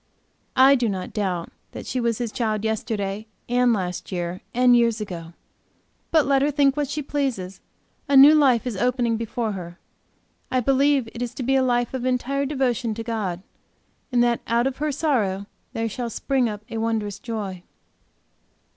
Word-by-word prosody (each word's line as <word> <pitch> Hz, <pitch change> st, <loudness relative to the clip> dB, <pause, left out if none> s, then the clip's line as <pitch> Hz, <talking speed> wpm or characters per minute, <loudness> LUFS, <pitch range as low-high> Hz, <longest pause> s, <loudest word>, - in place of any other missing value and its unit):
I 265 Hz, +1 st, +7 dB
do 245 Hz, -4 st, +2 dB
not 185 Hz, -2 st, -4 dB
doubt 185 Hz, -5 st, -2 dB, 0.2 s
that, -, -, -7 dB
she 255 Hz, -, -2 dB
was 235 Hz, -2 st, 0 dB
His 240 Hz, -3 st, -3 dB
child, 215 Hz, -2 st, -1 dB
yesterday 215 Hz, -1 st, -2 dB, 0.2 s
and 245 Hz, 0 st, +3 dB
last 185 Hz, -5 st, -3 dB
year, 175 Hz, 0 st, -3 dB
and 245 Hz, 0 st, +5 dB
years 230 Hz, -2 st, +3 dB
ago. 175 Hz, -5 st, -6 dB, 0.8 s
But 315 Hz, -3 st, +4 dB
let 275 Hz, -1 st, +3 dB
her 285 Hz, -, +3 dB
think, 280 Hz, -2 st, +3 dB
what 295 Hz, -2 st, -1 dB
she 300 Hz, 0 st, -3 dB
pleases. 255 Hz, -11 st, -3 dB, 0.5 s
A 280 Hz, -, +5 dB
new 280 Hz, +3 st, +10 dB
life 265 Hz, -6 st, +4 dB
is 245 Hz, -4 st, -3 dB
opening 240 Hz, +2 st, +1 dB
before 225 Hz, 0 st, -2 dB
her; 175 Hz, -3 st, -7 dB, 0.7 s
I 255 Hz, -, +1 dB
believe 275 Hz, 0 st, +2 dB
it 235 Hz, -, -7 dB
is 245 Hz, 0 st, -4 dB
to 260 Hz, -, -4 dB
be 270 Hz, +3 st, +2 dB
a 265 Hz, -, +4 dB
life 245 Hz, -1 st, +1 dB
of 260 Hz, -2 st, -3 dB
entire 255 Hz, +2 st, 0 dB
devotion 250 Hz, -5 st, 0 dB
to 225 Hz, -, -5 dB
God, 205 Hz, -6 st, -3 dB, 0.7 s
and 240 Hz, -1 st, +3 dB
that 240 Hz, -1 st, +1 dB
out 235 Hz, +1 st, +2 dB
of 270 Hz, -1 st, -1 dB
her 300 Hz, +1 st, -1 dB
sorrow 225 Hz, -10 st, 0 dB, 0.3 s
there 225 Hz, 0 st, -1 dB
shall 235 Hz, +2 st, -4 dB
spring 255 Hz, +1 st, 0 dB
up 210 Hz, 0 st, -7 dB
a 225 Hz, -, -3 dB
wondrous 220 Hz, -3 st, -2 dB
joy. 205 Hz, -5 st, -5 dB
235 Hz, 180 wpm, -23 LUFS, 210-265 Hz, 0.8 s, new